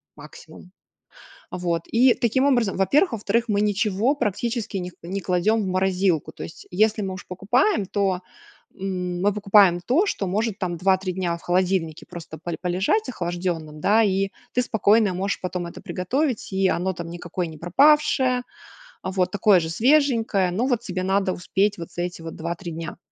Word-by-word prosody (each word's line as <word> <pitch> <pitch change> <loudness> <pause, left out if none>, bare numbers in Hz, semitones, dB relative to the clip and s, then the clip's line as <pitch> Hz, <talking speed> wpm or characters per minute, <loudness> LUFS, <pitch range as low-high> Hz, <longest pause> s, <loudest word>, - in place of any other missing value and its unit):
максимум. 155 +3 -13 0.8
Вот, 175 -2 -2
и 245 +2 +4
таким 245 +3 +1
образом, 240 -8 +2
во-первых, 280 - +3
во-вторых 230 +2 0
мы 205 -1 +1
ничего 210 +4 +1
практически 235 -3 -2
не 180 -1 -5
к - - -25
не 185 +4 -4
кладем 195 +5 +1
в - - -3
морозилку. 185 -3 0
То - - -8
есть, - - -11
если 215 +3 +2
мы 190 -1 -3
у 185 - -7
ж - - -12
покупаем, 205 - +1
то, 195 -2 0 0.5
м, 180 -2 -3
мы 205 +1 +3
покупаем 195 -3 +4
то, 330 +12 +3
что 200 - -2
может, 210 +3 -1
там, 180 -4 -2
2-3 190 +1 +1
дня 175 -2 -1
в - - -16
холодильнике 180 -3 0
просто 170 -2 -9
поль 170 +2 -5
полежать 190 - 0
охлажденным, 175 -6 -4
да. 215 +6 +4
И 195 -1 +1 0.2
ты 250 - +2
спокойно 220 -3 +3
можешь 195 +3 -2
потом 180 -1 -4
это 170 - -9
приготовить, 245 - -2
и 190 0 +2
оно 185 +2 0
там 170 -1 -7
никакое 175 +1 -4
не 160 - -10
пропавшее, 260 - +3 0.6
вот, 185 -1 0
такое 205 -1 +4
же 160 -1 -4
свеженькое. 230 - +2
Но 225 +8 0
вот 245 -3 +1
тебе 185 -5 -4
надо 190 0 +1
успеть 195 +4 0
вот 165 -2 -8
за 175 - -3
эти 175 -1 -5
вот 165 0 -7
2-3 170 +2 -5
дня. 165 +1 -6
190 Hz, 175 wpm, -23 LUFS, 175-220 Hz, 0.8 s, и